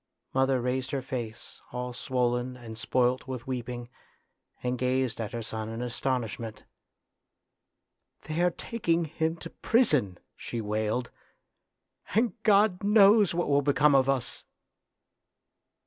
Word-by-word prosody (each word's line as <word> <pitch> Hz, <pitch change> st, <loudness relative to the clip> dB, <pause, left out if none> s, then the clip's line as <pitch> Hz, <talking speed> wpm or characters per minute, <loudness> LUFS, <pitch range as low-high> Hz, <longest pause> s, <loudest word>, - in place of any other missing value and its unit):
Mother 135 Hz, 0 st, +3 dB
raised 125 Hz, +1 st, -1 dB
her 140 Hz, -, -2 dB
face, 120 Hz, -3 st, -6 dB
all 125 Hz, 0 st, -4 dB
swollen 125 Hz, 0 st, -1 dB
and 115 Hz, -2 st, -9 dB
spoilt 125 Hz, +3 st, +1 dB
with 130 Hz, -3 st, -5 dB
weeping, 125 Hz, -1 st, -4 dB, 0.8 s
and 125 Hz, 0 st, -1 dB
gazed 130 Hz, -2 st, 0 dB
at 110 Hz, 0 st, -4 dB
her 120 Hz, -2 st, -4 dB
son 110 Hz, 0 st, -4 dB
in 115 Hz, +1 st, -5 dB
astonishment. 120 Hz, -2 st, -3 dB, 0.8 s
" -, -, -52 dB
They 155 Hz, +2 st, -2 dB
are 180 Hz, -, +4 dB
taking 170 Hz, -3 st, -1 dB
him 160 Hz, +1 st, -1 dB
to 165 Hz, 0 st, -9 dB
prison," 145 Hz, -, +2 dB, 0.2 s
she 120 Hz, -, -5 dB
wailed, 110 Hz, +3 st, -1 dB, 0.5 s
" -, -, -17 dB
and 225 Hz, -2 st, +3 dB
God 205 Hz, -3 st, +4 dB
knows 205 Hz, -2 st, +6 dB
what 175 Hz, -, 0 dB
will 140 Hz, 0 st, +3 dB
become 145 Hz, +1 st, +4 dB
of 135 Hz, 0 st, +4 dB
us." 135 Hz, -3 st, -1 dB
130 Hz, 130 wpm, -28 LUFS, 120-160 Hz, 0.8 s, knows